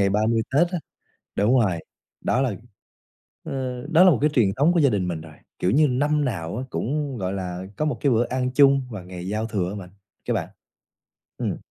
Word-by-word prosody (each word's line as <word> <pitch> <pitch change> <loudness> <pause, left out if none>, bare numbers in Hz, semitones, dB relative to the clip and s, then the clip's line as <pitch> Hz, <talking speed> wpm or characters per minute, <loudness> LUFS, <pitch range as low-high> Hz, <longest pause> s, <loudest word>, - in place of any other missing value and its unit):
ngày 100 - +4
30 110 +3 +2
Tết 165 +6 +4
á. 180 - -1 0.6
Đúng 115 +6 +4
rồi, 95 -7 +1 0.4
đó 125 - +1
là, 125 -7 0 0.9
ơ, 130 -2 -4
đó 165 +2 +7
là 185 - +8
một 140 - +3
cái 150 - +4
truyền 105 -6 +3
thống 150 +6 +4
của 175 - +3
gia 140 - +5
đình 100 -5 0
mình 85 -3 -3
rồi, 80 -1 -12 0.3
kiểu 90 - +1
như, 150 +6 +5
năm 145 +3 +1
nào 95 -7 -3
á 125 - -3
cũng, 140 +1 -2
gọi 95 -2 -2
là, 90 -1 -4
có 155 - -1
một 150 - -1
cái 140 - +3
bữa 115 +1 +3
ăn 130 0 -1
chung 140 -1 +6
vào 105 -6 -7
ngày 90 0 -8
giao 105 +3 -1
thừa 95 -5 -1
á 100 - -5
bạn 95 -3 -8 0.4
cá - - 0
bạn. - - -2 0.9
Ừm. - - -2
120 Hz, 220 wpm, -24 LUFS, 95-140 Hz, 0.9 s, là